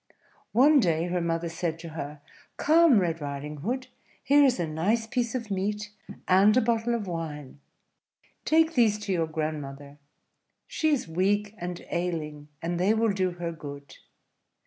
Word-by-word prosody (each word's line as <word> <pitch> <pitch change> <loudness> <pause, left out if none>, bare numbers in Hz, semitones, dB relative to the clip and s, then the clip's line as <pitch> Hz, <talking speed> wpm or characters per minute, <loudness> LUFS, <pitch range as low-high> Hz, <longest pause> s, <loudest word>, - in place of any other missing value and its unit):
One 280 +6 +6
day 165 -7 +1
her 180 0 0
mother 165 0 -1
said 165 0 -3
to 165 0 -9
her, 150 -2 -7 0.4
"Come, 320 -4 +5
Red 165 -3 -1
Riding 145 +1 -5
Hood, 245 - -3 0.4
here 285 +2 +5
is 260 -3 +3
a 170 - 0
nice 185 +9 0
piece 240 +1 -2
of 230 -4 -4
meat, 210 +2 -2 0.4
and 200 +5 +5
a - - +5
bottle 235 0 +1
of 220 -3 -3
wine: 155 -6 -6 0.8
take 320 +1 +3
these 225 -6 +3
to 210 -2 -3
your 165 -2 0
grandmother; 145 -2 -5 0.7
she 315 - 0
is 285 - 0
weak 200 +5 0
and 175 0 -6
ailing, 155 -4 -3 0.2
and 170 +1 -2
they 200 +5 +3
will 225 -2 +2
do 185 -2 0
her 175 -1 -4
good. 145 -3 -10
180 Hz, 160 wpm, -27 LUFS, 160-225 Hz, 0.8 s, One